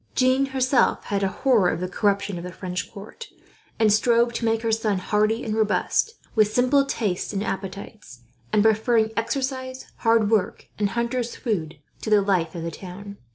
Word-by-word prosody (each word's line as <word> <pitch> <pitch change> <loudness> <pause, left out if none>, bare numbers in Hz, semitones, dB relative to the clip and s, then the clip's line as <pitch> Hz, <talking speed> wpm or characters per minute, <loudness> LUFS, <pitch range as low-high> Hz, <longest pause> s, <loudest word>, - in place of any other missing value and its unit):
Jeanne 260 +1 +3
herself 260 -2 +2
had 200 -1 -2
a 195 - +2
horror 220 -2 +2
of 160 - -2
the 185 - -2
corruption 200 -1 0
of - - -8
the 180 - -6
French 180 0 -5
court, 210 - -10 0.5
and 220 -2 +4
strove 235 +2 +3
to 235 - -2
make 225 0 +1
her 225 - 0
son 220 -2 +1
hardy 215 +5 0
and 215 - -2
robust, 220 - +1 0.2
with 215 -2 +3
simple 255 +5 +3
tastes 210 -8 -2
and 200 0 -1
appetites; 195 - -6 0.3
and 205 - +3
preferring 220 0 +3
exercise, 260 +2 -3
hard 225 -2 +2
work, 215 -4 0
and 205 -1 +1
hunter's 235 0 -1
food 165 - -3 0.2
to - - -4
the 210 -2 +4
life 180 -5 0
of 165 - -5
the 165 - -3
town. 200 +4 -9
215 Hz, 180 wpm, -24 LUFS, 195-235 Hz, 0.5 s, and